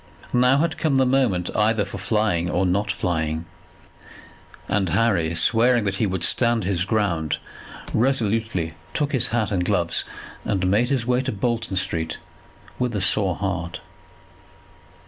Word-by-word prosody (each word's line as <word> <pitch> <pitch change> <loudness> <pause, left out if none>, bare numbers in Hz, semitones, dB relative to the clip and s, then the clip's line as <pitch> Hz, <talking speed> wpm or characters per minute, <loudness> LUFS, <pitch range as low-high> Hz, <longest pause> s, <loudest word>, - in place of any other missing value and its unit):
Now 125 +2 +4
had 160 +2 0
come 155 -4 +1
the 135 0 +4
moment 125 -9 +1
either 105 -1 +2
for 100 - -7
flying, 105 -6 0
or 90 +2 +1
not 100 +3 0
flying; 80 -3 -2 1.2
and 95 -3 0
Harry 85 -4 +1
swearing 120 +5 +4
that 100 -1 -1
he 110 - +1
would 95 -1 -3
stand 120 -3 +3
his 90 -1 0
ground, 95 -8 0 0.6
resolutely 110 -8 0 0.2
took 145 -1 0
his 130 -5 +1
hat 110 -3 -1
and 90 -3 0
gloves, 90 -3 0 0.4
and 95 -1 -1
made 105 +6 +2
his 130 -5 0
way 125 +1 +2
to 130 0 -3
Bolton 115 0 -2
Street 80 -3 -1 0.6
with 125 -3 -1
a 100 - -1
sore 95 -1 +1
heart. 90 -3 -3
105 Hz, 145 wpm, -23 LUFS, 90-120 Hz, 1.2 s, Now